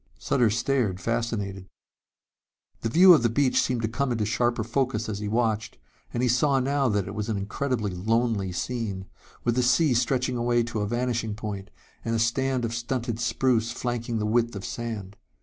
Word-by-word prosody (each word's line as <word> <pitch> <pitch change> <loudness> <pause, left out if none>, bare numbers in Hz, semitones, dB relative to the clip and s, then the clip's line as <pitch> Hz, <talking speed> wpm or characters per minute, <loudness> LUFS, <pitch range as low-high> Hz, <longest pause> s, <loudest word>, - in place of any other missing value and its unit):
Sutter 115 - +2
stared, 115 -3 0
fascinated. 100 -4 -3 1.1
The 115 - -2
view 180 +8 +8
of 155 - +5
the 120 - +2
beach 130 +3 +2
seemed 120 -2 -1
to - - +2
come 130 +4 -1
into 110 -3 0
sharper 120 +1 0
focus 115 -1 -1
as 105 -2 -3
he 105 - -4
watched, 110 0 0 0.3
and 120 - -1
he - - +3
saw 135 +3 +3
now 135 0 +1
that 100 -3 0
it 100 - -5
was 105 +1 -3
an 110 - 0
incredibly 105 +1 -2
lonely 110 0 0
scene, 100 0 -3 0.4
with 120 - +2
the 125 - +2
sea 125 +4 +3
stretching 125 +1 +1
away 120 0 +2
to 115 -1 -4
a 105 - -1
vanishing 120 -2 -1
point 105 -2 -6 0.3
and 115 0 -1
a - - +2
stand 125 +2 +1
of 115 - -3
stunted 120 -1 -2
spruce 115 -1 +1
flanking 120 -1 -3
the 105 - -1
width 115 +1 +1
of 95 - -6
sand. 110 -5 -5
115 Hz, 185 wpm, -26 LUFS, 105-125 Hz, 1.1 s, view